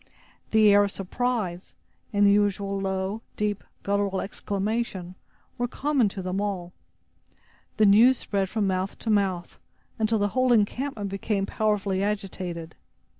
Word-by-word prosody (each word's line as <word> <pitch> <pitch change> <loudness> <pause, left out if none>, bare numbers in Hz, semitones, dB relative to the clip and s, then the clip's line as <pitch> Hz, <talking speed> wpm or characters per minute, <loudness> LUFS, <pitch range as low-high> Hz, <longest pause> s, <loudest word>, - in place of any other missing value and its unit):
The 220 -1 +5
air 205 0 +6
of - - -2
surprise, 195 -3 -3 0.4
and 205 -1 +3
the 200 - +6
usual 200 -1 +1
low, 190 +2 -2 0.2
deep, 210 -1 -1 0.2
guttural 200 -1 0
exclamation, 200 -2 -3 0.5
were 245 - +1
common 270 -3 +1
to 195 -1 -6
them 185 +2 -2
all. 185 -4 -3 1.0
The 215 - +5
news 230 +6 +6
spread 195 -2 -1
from 215 -1 0
mouth 185 0 -1
to 225 - -2
mouth, 190 -4 0 0.4
until 220 0 +2
the 205 0 +1
whole 255 +3 +2
encampment 215 -1 0
became 195 0 -1
powerfully 205 -3 0
agitated. 185 -5 -3
200 Hz, 135 wpm, -26 LUFS, 190-215 Hz, 1.0 s, air